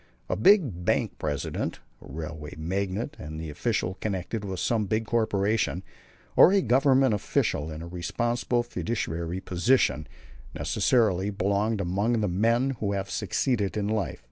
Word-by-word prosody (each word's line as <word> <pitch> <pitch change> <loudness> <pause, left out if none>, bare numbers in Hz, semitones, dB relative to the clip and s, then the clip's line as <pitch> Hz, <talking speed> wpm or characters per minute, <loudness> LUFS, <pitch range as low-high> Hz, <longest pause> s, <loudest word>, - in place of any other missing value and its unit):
A - - +1
big 115 - +4
bank - - 0
president, 75 -2 -3 0.2
a - - -12
railway 75 0 -6
magnate, 95 - -2
an 75 +1 -7
official 95 +2 -2
connected 100 +1 -3
with 95 -3 -4
some 110 -3 0
big 110 +3 0
corporation, 105 -4 0 0.5
or - - +8
a 195 -1 +3
Government 135 -1 +4
official 80 -6 0
in 80 +1 -7
a - - -7
responsible 120 +7 -1
fiduciary 90 -7 -3
position, 90 - +1 0.5
necessarily 105 -6 +2
belongs 100 +2 0
among 100 +6 0
the 105 - +1
men 115 +8 +2
who 100 -1 -1
have 100 0 -3
succeeded 110 -6 0
in 100 -1 -1
life. 110 -1 -1
100 Hz, 140 wpm, -27 LUFS, 90-115 Hz, 0.5 s, or